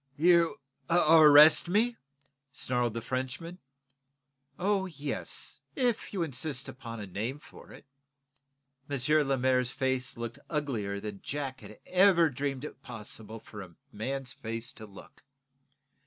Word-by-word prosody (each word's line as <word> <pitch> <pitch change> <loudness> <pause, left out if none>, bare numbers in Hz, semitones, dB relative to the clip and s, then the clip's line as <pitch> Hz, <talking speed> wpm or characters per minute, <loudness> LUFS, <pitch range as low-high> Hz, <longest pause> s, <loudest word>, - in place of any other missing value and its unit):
"You 170 +1 +4 0.3
ar 170 - +4 0.3
r - - +8
rest 150 +4 +8
me?" 225 +6 +2 0.6
snarled 125 -4 -1
the 115 - -4
Frenchman. 130 +8 -4 1.0
"Oh, 195 +1 +1
yes; 150 -4 -5 0.2
if 245 -4 0
you 190 -4 -1
insist 140 -2 -3
upon 120 -3 -8
a 105 - -5
name 110 +8 -4
for 150 - -15
it." - - -14 1.0
M. 145 +2 +2
Lemaire's 130 -2 +2
face 130 -1 -1
looked 120 +3 -6
uglier 115 -10 -2
than 105 -1 -7
Jack 135 -2 -4
had - - -12
ever 180 -4 +4
dreamed 135 +1 -3
it 135 - -10
possible 110 -2 -7
for 105 -1 -10
a 90 -3 -12 0.2
man's 130 +4 -4
face 115 +2 -5
to 110 - -10
look. 100 -1 -15
130 Hz, 135 wpm, -30 LUFS, 115-155 Hz, 1.0 s, r